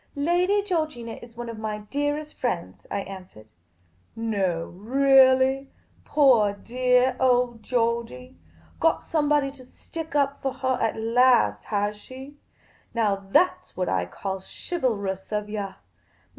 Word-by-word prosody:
" - - -37
Lady 355 +7 +2
Georgina 310 - -2
is 235 -1 -14
one 240 - -5
cf 230 -2 -7
my 215 -1 -3
dearest 290 +7 -3
friends," 170 - -4
I 200 - -2
answered. 185 - -10 0.5
" 90 +1 -37
No, 195 -8 -1
reahliy? 265 +4 +4 0.4
Poor 245 -9 +4
deah 250 +4 +1
old 245 -2 +2
Georgey! 230 - -2 0.4
Got 325 0 +2
somebody 295 -3 +1
to 270 -2 -15
stick 320 +4 -9
up 280 -1 +1
for 270 -1 -1
her 260 -1 -1
at - - 0
last, 230 - +3
has 205 0 -1
she? 265 +6 -11 0.6
Now 215 -3 +2
that 195 -1 +2
's - - -26
what 185 - -1
I 95 -1 0
call 190 - -5
chivalrous 200 - -3
of 210 0 -2
yah. 200 -3 -4
240 Hz, 140 wpm, -25 LUFS, 200-275 Hz, 0.6 s, reahliy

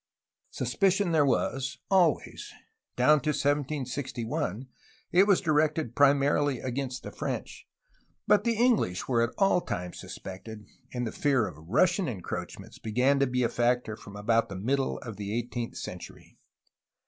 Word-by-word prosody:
Suspicion 195 -1 +1
there 155 -3 +4
was, 135 0 0
always. 180 -6 +1 0.4
Down 145 +4 +4
to 155 - -1
1761 140 - -2 0.4
it 190 +3 +5
was 200 -3 +4
directed 155 - +1
primarily 145 -1 +3
against 130 0 -4
the - - -7
French, - - -5 0.6
but - - +4
the 235 -1 +1
English 220 - +1
were 120 -3 +2
at 115 +1 -1
all 195 -2 +3
times 90 - -5
suspected, 105 +3 -9 0.3
and 125 -1 -2
the 110 - -3
fear 135 -6 +2
of 80 -1 -11
Russian 180 - +3
encroachments 105 -9 -6
began 125 +6 +2
to 140 - +3
be 125 0 0
a - - +3
factor 120 -1 0
from 100 -1 -12
about 115 +3 +1
the 100 - -6
middle 130 +8 0
of 115 -6 -7
the 100 -1 -5
eighteenth 120 0 -3
century. 90 -1 -9
130 Hz, 145 wpm, -28 LUFS, 115-150 Hz, 0.6 s, it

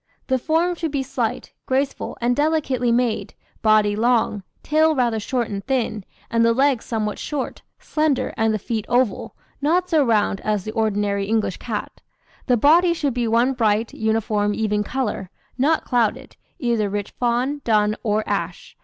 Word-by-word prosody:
The 260 -1 +1
form 330 +6 +1
should 330 -2 -3
be 280 -2 -1
slight, 260 - -3
graceful, 270 +1 -1
and 240 +1 +1
delicately 290 -5 +1
made, 235 -1 0 0.3
body 215 -1 +4
long, 225 -2 +1 0.2
tail 315 +1 +3
rather 240 -4 +1
short 240 +2 -1
and 200 -1 -5
thin, 230 -7 -1 0.3
and 230 0 +3
the 230 0 +4
legs 265 -1 +2
somewhat 215 -2 -2
short, 290 -3 -4 0.2
slender, 305 -3 0
and 220 0 +2
the 215 - 0
feet 215 +1 -4
oval, 245 -4 0 0.3
not 355 +6 +1
so 310 -3 +4
round 210 -5 +1
as 210 -3 -1
the 215 - -5
ordinary 205 -3 0
English 215 -3 0
cat. 220 -4 -5 0.5
The 250 -2 +4
body 340 +7 +5
should 285 -5 -1
be 240 -1 -1
one 235 +4 +3
bright, 225 -2 +1
uniform, 215 -2 0
even 210 -1 0
colour, 210 -6 -3 0.3
not 295 +5 +1
clouded, 240 -4 0 0.2
either 235 - 0
rich 205 0 -3
fawn, 250 +4 0
dun, 215 -2 +2
or 215 0 0
ash. 180 -4 -3
235 Hz, 160 wpm, -22 LUFS, 215-270 Hz, 0.5 s, body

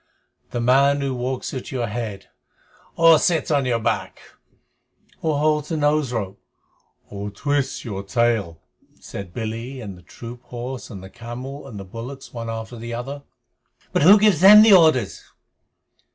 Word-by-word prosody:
"The 120 - -3
man 140 +4 +3
who 135 -1 -1
walks 125 +1 -4
at 130 - -6
your 125 -3 -2
head 105 -3 -5 0.7
Or 165 -2 +6
sits 165 -5 +1
on 140 -3 +2
your 120 -2 +1
back 115 0 -2 1.0
Or 155 -3 0
holds 150 0 +1
the 165 - -1
nose 145 -3 +1
rope 100 -5 -4 0.7
Or 100 0 -5
twists 140 +6 -2
your 100 -4 -4
tail," 100 -5 0 0.4
said 100 -3 -8
Billy 115 +5 -5
and 100 -6 -7
the 90 - -16
troop 120 +6 -10
horse 125 +1 -7
and 100 -5 -9
the 95 - -10
camel 130 +4 -8
and 110 -6 -9
the 100 - -8
bullocks 120 +7 -9
one 115 -1 -5
after 115 +1 -6
the 115 +1 -6
other. 135 +4 -6 0.7
"But - - +2
who 190 +8 +8
gives 205 -6 +3
them 210 +3 +10
the 220 -2 +7
orders?" 155 - +4
125 Hz, 160 wpm, -22 LUFS, 115-145 Hz, 1.0 s, them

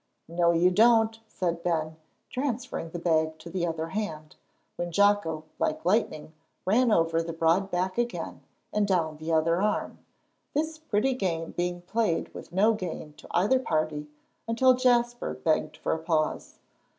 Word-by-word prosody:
"No, 170 +1 +2
you 170 +2 +4
don't," 225 +2 +4
said 170 -5 -2
Ben, 160 -2 -1 0.4
transferring 255 - -3
the 175 - -6
bag 160 -2 +1
to 170 +1 -10
the 175 -1 -1
other 165 0 -3
hand, 160 -6 -4 0.4
when 175 0 -3
Jocko 205 -5 +2 0.2
like 155 - -1
lightning 180 -6 0 0.3
ran 230 +5 +3
over 165 -3 +3
the 165 0 -4
broad 165 +4 +2
back 185 +3 -1
again, 240 0 -3 0.3
and 210 -1 +2
down 165 -5 0
the 160 +2 -4
other 165 +2 +2
arm; 210 0 -1 0.6
this 315 +1 -1
pretty 265 -4 +1
game 170 -8 -2
being 175 0 -2
played 215 -2 -1
with - - -10
no 205 +5 +4
gain 170 -6 -5
to - - -13
either 210 +9 +3
party, 155 -8 -1 0.4
until 255 +3 +5
Jasper 240 -1 +1
begged 155 -1 0
for - - -1
a 160 - -2
pause. 160 -1 -1
175 Hz, 155 wpm, -27 LUFS, 165-220 Hz, 0.6 s, until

